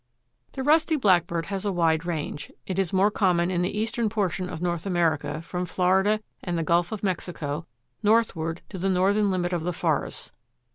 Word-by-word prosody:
The 265 - -4
Rusty 315 +3 +4
Blackbird 175 - +2
has 195 -1 -4
a 205 - 0
wide 165 -2 +1
range. 150 -3 -4
It 190 0 -2
is 190 -4 +1
more 195 +2 +3
common 180 -4 +2
in 175 -1 0
the 180 +4 -1
eastern 225 +1 0
portion 190 -4 -1
of 160 - -6
North 175 +1 -2
America 165 -3 0
from 180 +1 -4
Florida 190 +4 +2 0.2
and 175 -2 -2
the 165 - 0
Gulf 170 +2 +2
of 215 -2 -5
Mexico 165 -5 -3 0.3
northward 200 -7 +1
to 190 - -7
the 195 +2 0
northern 200 +3 +3
limit 180 -1 -1
of 175 - 0
the 175 +2 -1
forests. - - -2
180 Hz, 185 wpm, -26 LUFS, 170-200 Hz, 0.3 s, Rusty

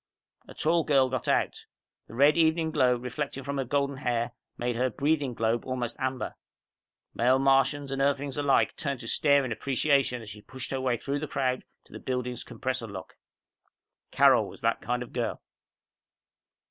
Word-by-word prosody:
A - - -12
tall 165 +1 +2
girl 135 -4 +3
got 130 -3 -3
out. - - 0 0.4
The 115 - -11
red 145 +4 +5
evening 160 -1 +2
glow 125 -4 +3
reflecting 130 +3 -4
from 140 +1 -3
her - - +1
golden 140 +1 -1
hair, 120 -3 -1 0.3
made 120 0 -1
her 125 +2 +1
breathing 140 0 0
globe 115 +1 0
almost 125 -2 -3
amber. 130 -1 -2 0.8
Male 125 +3 +3
Martians 135 +1 +2
and 135 0 -1
Earthlings 140 0 0
alike 145 -2 +2
turned 140 -4 -3
to 115 - -8
stare 140 +2 +3
in 125 - -4
appreciation 135 0 +1
as 105 - -10
she 105 +1 -11
pushed 130 +3 -7
her 135 -1 -2
way 125 -2 +1
through 140 +5 -3
the 155 - -4
crowd 130 -2 -1 0.2
to - - -19
the - - -7
building's 125 -1 -3
compressor 130 -3 -4
lock. 95 -3 -9 0.9
Carol - - +5
was - - -12
that - - +1
kind 125 +1 -2
of 125 - -14
girl. 120 -2 -2
130 Hz, 175 wpm, -28 LUFS, 125-140 Hz, 0.9 s, red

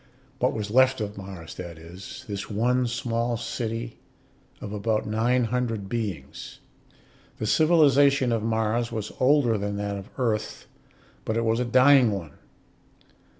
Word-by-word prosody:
What 125 - +2
was 105 -2 -4
left 130 +2 +4
of 105 -1 -4
Mars, 95 -4 -9
that 85 -2 -8
is; 85 +4 -10
this 100 -1 -5
one 125 +4 +1
small 120 -1 -1
city 115 0 -4 0.6
of 105 - -7
about 105 +1 -1
nine 115 +4 +1
hundred 115 -4 -2
beings. 100 - -5 0.8
The - - -3
civilization 140 -2 +4
of 115 -2 0
Mars 110 +1 0
was 110 -2 -4
older 130 -5 +3
than 100 0 -3
that 100 0 -3
of 100 0 -9
Earth, 115 -5 -2 0.6
but 110 - -2
it 115 - 0
was 115 +1 +1
a 125 - 0
dying 130 +1 +6
one. 90 -7 -5
115 Hz, 145 wpm, -25 LUFS, 105-125 Hz, 0.8 s, dying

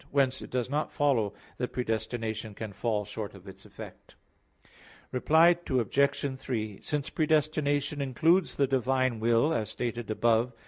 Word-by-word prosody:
Whence 135 -2 +1
it - - -9
does 125 -2 -1
not 145 +3 -1
follow 120 -8 +1 0.2
that 125 - -3
predestination 110 -2 -3
can 110 -1 -6
fall 105 0 -1
short 105 0 -6
of 95 0 -14
its 95 - -12
effect. - - -12 1.0
Reply 160 +7 +5
Obj. 135 +2 +1
3: 110 -7 -4
Since 145 -2 -2
predestination 150 -2 +1
includes 160 +7 +2
the 140 - +3
divine 130 -2 +1
will 115 +7 +3
as 110 -2 -1
stated 120 -2 -4
above 115 +2 +2
(A. 115 - -30
125 Hz, 145 wpm, -29 LUFS, 110-140 Hz, 1.0 s, Reply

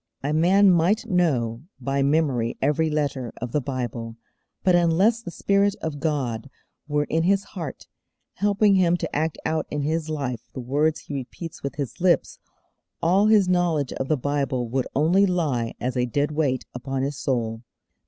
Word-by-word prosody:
A 145 +2 0
man 190 +5 +5
might 180 +7 +2
know 140 - +1 0.2
by 135 +2 -1
memory 135 -5 +1
every 150 +3 +1
letter 140 -5 -2
of 125 -1 -5
the 150 - +1
Bible, 120 -4 -4 0.5
but 185 - +4
unless 175 +7 +3
the 225 - -7
Spirit 200 +3 +1
of 155 -6 -5
God 140 -6 -2 0.4
were 145 0 +1
in 160 +2 0
his 195 +3 +2
heart, 165 -8 -7 0.5
helping 205 +1 +3
him 175 -2 +3
to - - -4
act 155 +2 0
out 160 - -1
in 150 -1 -2
his 160 +1 -1
life 130 -7 -4
the - - -6
words 145 +5 0
he - - -9
repeats 140 +5 -6
with 140 -1 -4
his 140 +2 -5
lips, 180 -1 +2 0.6
all 190 +5 +3
his 210 -3 +5
knowledge 175 -6 +1
of 135 - -3
the 155 - +2
Bible 135 -2 -1
would 130 +1 -1
only 175 +8 +4
lie 145 -11 -1
as 125 0 -2
a 125 0 +1
dead 145 +5 0
weight 145 -4 0
upon 130 +2 -3
his 140 +1 -3
soul. 115 -4 -1
150 Hz, 175 wpm, -24 LUFS, 130-175 Hz, 0.6 s, man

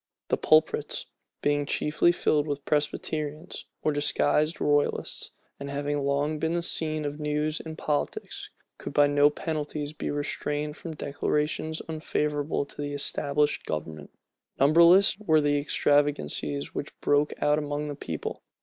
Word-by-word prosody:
The - - +2
pulpits, 155 0 +2 0.4
being 145 0 +1
chiefly 150 +4 +2
filled 150 -3 +1
with 145 -1 -3
Presbyterians 150 +2 -2 0.2
or 155 - +2
disguised 150 +2 +1
royalists, 145 0 0 0.3
and 140 0 -6
having 145 +1 -1
long 145 +2 0
been 160 +2 0
the 170 - 0
scene 155 -2 -1
of 145 +1 -4
news 150 +1 -1
and 160 -1 -7
politics, 150 -3 -3 0.3
could - - -6
by 145 0 +6
no 145 0 +5
penalties 150 -1 -4
be 155 - -4
restrained 150 +1 -2
from 160 -1 -7
declarations 150 +2 -1
unfavorable 150 -2 -1
to 145 - -9
the 145 0 -3
established 145 +1 0
government. 75 -1 -5 0.5
Numberless 170 +7 +6
were 160 -7 +3
the 145 -1 +2
extravagancies 140 - +1
which - - -6
broke 145 +1 +2
out 150 +1 +3
among 145 0 -3
the 145 - -3
people. 80 - -5
150 Hz, 140 wpm, -27 LUFS, 145-155 Hz, 0.5 s, by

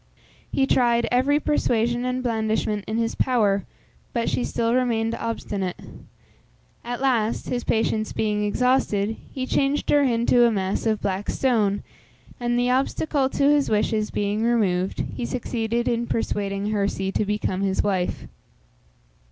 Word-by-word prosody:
He 270 - +2
tried 240 -3 +2
every 270 +4 +3
persuasion 240 -5 +1
and 255 0 -2
blandishment 220 -3 -1
in 220 +2 -2
his 230 0 0
power, 210 -6 +1 0.5
but 235 -1 0
she 250 - 0
still 230 0 0
remained 230 -3 +1
obstinate. 205 -6 -3 1.1
At 245 +1 -4
last, 235 -5 0
his 245 -1 -2
patience 220 -1 0
being 210 -1 0
exhausted, 220 -2 +1 0.2
he 260 -1 -3
changed 275 +2 0
her 290 - +5
into 240 -2 +3
a 235 - +5
mass 195 +1 -1
of 215 -1 0
black 195 +1 -2
stone, 215 -6 +1 0.6
and, 240 0 0
the 245 +1 +2
obstacle 270 +1 +1
to 280 - -1
his 290 -2 +2
wishes 215 0 +1
being 205 +1 -1
removed, 200 -6 +1
he - - -4
succeeded 235 -1 -2
in 235 0 0
persuading 200 -2 -2
Herse 200 -2 -1
to - - +1
become 205 -2 -1
his 195 -1 +1
wife. 190 -3 -1
230 Hz, 145 wpm, -24 LUFS, 210-245 Hz, 1.1 s, her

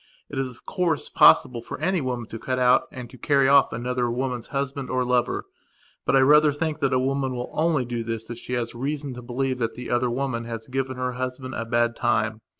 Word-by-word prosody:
It 140 - -3
is, 135 -1 -1
of 125 - -15
course, 170 -5 -1
possible 125 -4 +5
for - - -7
any 185 -3 +1
woman 125 -3 -3
to 115 - -7
cut 130 +2 -2
out 125 0 +4
and 125 -2 -7
to 130 - -14
carry 140 -2 +3
off 140 0 +5
any 120 +2 -4
other 125 -1 0
woman's 125 -1 -3
husband 140 -1 -3
or 130 0 0
lover. 125 -1 0 0.6
But - - +3
I 135 - +6
rather 150 +2 +6
think 155 +1 -2
that 135 -2 +1
a 130 - +3
woman 135 0 0
will 125 0 -5
only 155 -5 +1
do 120 -1 -3
this 115 -1 -4
if 120 - -6
she 125 - -7
has 120 -1 -2
reason 140 +2 -3
to 125 - -8
believe 130 +1 -2
that 115 -2 -2
the 125 0 -6
other 120 0 +2
woman 120 -2 -2
has 115 -1 -6
given 130 0 -3
her 125 0 -1
husband 130 +1 -5
a 115 - -3
bad 120 0 +1
time. 110 -2 0
125 Hz, 235 wpm, -24 LUFS, 120-135 Hz, 0.6 s, I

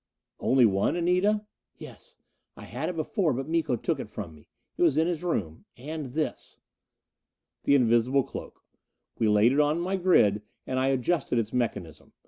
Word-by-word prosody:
"Only 130 -2 +4
one, 100 - +1
Anita?" 180 +5 +1 0.3
"Yes. - - -13 0.4
I - - -10
had - - -4
it 180 - -5
before, 160 - 0
but 135 +3 -4
Miko 160 -5 0
took 115 - -2
it - - -6
from 80 - -7
me. 75 - -19 0.3
It - - -6
was 160 -5 +3
in 160 - +3
his 175 -1 -2
room. 90 - -3
And 145 0 -6
this 155 -1 -4 0.5
" - - -60
The 140 - +5
invisible 125 +1 +3
cloak. - - -9 0.6
We 110 - +2
laid 105 +3 +4
it 140 - +1
on 150 +2 +2
my 185 +3 -1
grid, 110 - +3 0.2
and 130 0 -2
I 130 - +1
adjusted 135 0 0
its 115 -2 -1
mechanism. 110 - -3
135 Hz, 175 wpm, -27 LUFS, 115-170 Hz, 0.6 s, The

